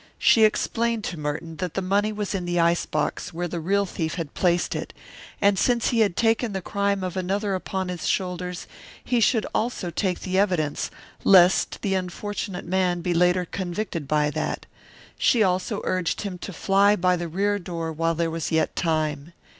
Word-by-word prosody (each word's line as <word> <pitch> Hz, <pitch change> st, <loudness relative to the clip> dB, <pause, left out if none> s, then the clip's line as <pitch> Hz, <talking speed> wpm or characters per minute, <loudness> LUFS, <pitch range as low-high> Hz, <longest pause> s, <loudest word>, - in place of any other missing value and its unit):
She 220 Hz, -1 st, +6 dB
explained 230 Hz, +1 st, 0 dB
to 175 Hz, -4 st, -4 dB
Merton 155 Hz, +2 st, -4 dB
that 180 Hz, -3 st, -4 dB
the 195 Hz, -, 0 dB
money 200 Hz, +3 st, +1 dB
was 210 Hz, -1 st, -3 dB
in 185 Hz, -3 st, -2 dB
the 175 Hz, 0 st, 0 dB
ice 170 Hz, 0 st, +2 dB
box 155 Hz, +2 st, -2 dB
where 175 Hz, +1 st, -2 dB
the 170 Hz, 0 st, -4 dB
real 200 Hz, +5 st, +1 dB
thief 160 Hz, -4 st, -3 dB
had 165 Hz, -5 st, -5 dB
placed 175 Hz, -1 st, +1 dB
it, -, -, -5 dB, 0.5 s
and 200 Hz, -1 st, +3 dB
since 240 Hz, -2 st, +2 dB
he 235 Hz, -, +1 dB
had 205 Hz, -5 st, +3 dB
taken 225 Hz, -1 st, +1 dB
the 190 Hz, -, -1 dB
crime 200 Hz, 0 st, 0 dB
of 185 Hz, -1 st, -3 dB
another 195 Hz, +2 st, -1 dB
upon 190 Hz, 0 st, -3 dB
his 180 Hz, -2 st, -4 dB
shoulders 180 Hz, -1 st, -2 dB, 0.4 s
he 245 Hz, -, +1 dB
should 225 Hz, 0 st, +3 dB
also 215 Hz, -6 st, -1 dB
take 180 Hz, +2 st, -1 dB
the 185 Hz, 0 st, 0 dB
evidence, 175 Hz, -7 st, 0 dB, 0.3 s
lest 185 Hz, -1 st, +5 dB
the 195 Hz, -, +1 dB
unfortunate 190 Hz, +1 st, -3 dB
young 175 Hz, -, -9 dB
man 180 Hz, -2 st, +1 dB
be 175 Hz, +1 st, 0 dB
later 180 Hz, +1 st, +3 dB
convicted 175 Hz, -3 st, -4 dB
by 150 Hz, 0 st, +2 dB
that; -, -, -3 dB, 0.5 s
she 230 Hz, -3 st, +4 dB
also 185 Hz, -1 st, 0 dB
urged 185 Hz, -2 st, -1 dB
him 190 Hz, -4 st, -5 dB
to 195 Hz, -, -6 dB
fly 200 Hz, +3 st, +3 dB
by 180 Hz, -1 st, +2 dB
the 175 Hz, -1 st, -3 dB
rear 200 Hz, +5 st, 0 dB
door 165 Hz, -3 st, -4 dB
while 165 Hz, +1 st, 0 dB
there 165 Hz, 0 st, 0 dB
was 165 Hz, -1 st, -3 dB
yet 160 Hz, -1 st, +1 dB
time. 155 Hz, -1 st, -1 dB
180 Hz, 190 wpm, -24 LUFS, 170-200 Hz, 0.5 s, She